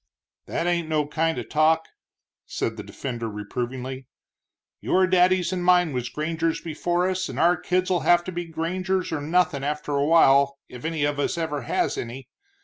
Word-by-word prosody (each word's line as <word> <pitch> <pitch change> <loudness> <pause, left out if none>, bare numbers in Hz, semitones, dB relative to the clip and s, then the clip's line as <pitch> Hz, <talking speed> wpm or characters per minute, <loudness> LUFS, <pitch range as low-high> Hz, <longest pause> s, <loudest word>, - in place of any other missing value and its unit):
"That 170 - -2
ain't 170 -2 0
no 155 -2 +1
kind 160 +2 -1
of - - -5
talk," 160 +1 +3 0.6
said - - -2
the - - -6
defender, 120 -4 -5
reprovingly, 125 +5 -5 0.7
"your 185 0 +2
daddies 185 0 +3
and 180 -1 -2
mine 180 -3 +4
was 125 -1 -2
grangers 165 +1 -1
before 175 +3 -1
us, 185 0 -2
and - - -7
our 175 +1 +5
kids'll 180 +1 0
have 175 0 +4
to 185 - -5
be 175 0 -4
grangers 180 +3 -2
or 160 -2 -2
nothin' 160 -2 +1
after 150 +1 -3
a 140 0 +1
while 140 -4 +5
if 125 +2 -10
any 160 -2 -1
of 145 0 0
us 145 - -1
ever 160 -4 -2
has 120 - -1
any. 120 +3 -7
160 Hz, 175 wpm, -24 LUFS, 140-175 Hz, 0.7 s, our